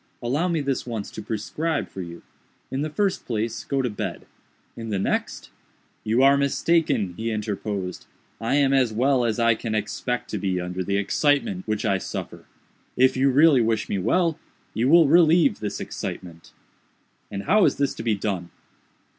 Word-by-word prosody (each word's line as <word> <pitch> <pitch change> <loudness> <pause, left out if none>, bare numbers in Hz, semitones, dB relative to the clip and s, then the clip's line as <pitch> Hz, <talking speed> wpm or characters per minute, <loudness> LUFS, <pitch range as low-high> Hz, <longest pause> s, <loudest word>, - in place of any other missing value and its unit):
Allow 140 +9 0
me 165 -3 0
this 135 -3 -2
once 110 -4 -4
to - - -7
prescribe 115 +10 -2
for 95 - -8
you. 85 -1 -9 0.5
In 135 - -2
the 155 - -2
first 195 +5 -1
place, 115 -1 -2
go 135 -1 -1
to 125 - 0
bed. 105 - -5 0.5
In 115 -1 -7
the 100 - -1
next—" 95 - -2 0.5
"You 115 +4 +2
are 140 +1 +6
mistaken," 140 - +1
he 115 +1 -2
interposed, 105 -3 -4 0.3
"I 115 +5 0
am 140 -1 +3
as 130 -4 +3
well 125 +3 +2
as 115 -1 0
I 115 -1 +4
can 110 0 -4
expect 115 +3 -3
to 105 - -2
be 95 -1 -1
under 90 +1 -3
the 100 +2 -1
excitement 100 - 0
which 110 0 -1
I 100 -3 +1
suffer. - - -6 0.5
If 130 +1 +4
you 135 +1 +3
really 140 0 +5
wish 110 -1 0
me 100 - -1
well, 165 - +1 0.3
you 120 +4 +1
will 165 -1 +7
relieve 165 +2 +4
this 105 - -4
excitement." 85 -2 -7 0.8
"And 100 -1 -5
how 210 - +4
is - - +2
this 140 -1 0
to - - -7
be 115 -2 +1
done?" 95 -4 -3
115 Hz, 180 wpm, -24 LUFS, 105-140 Hz, 0.8 s, will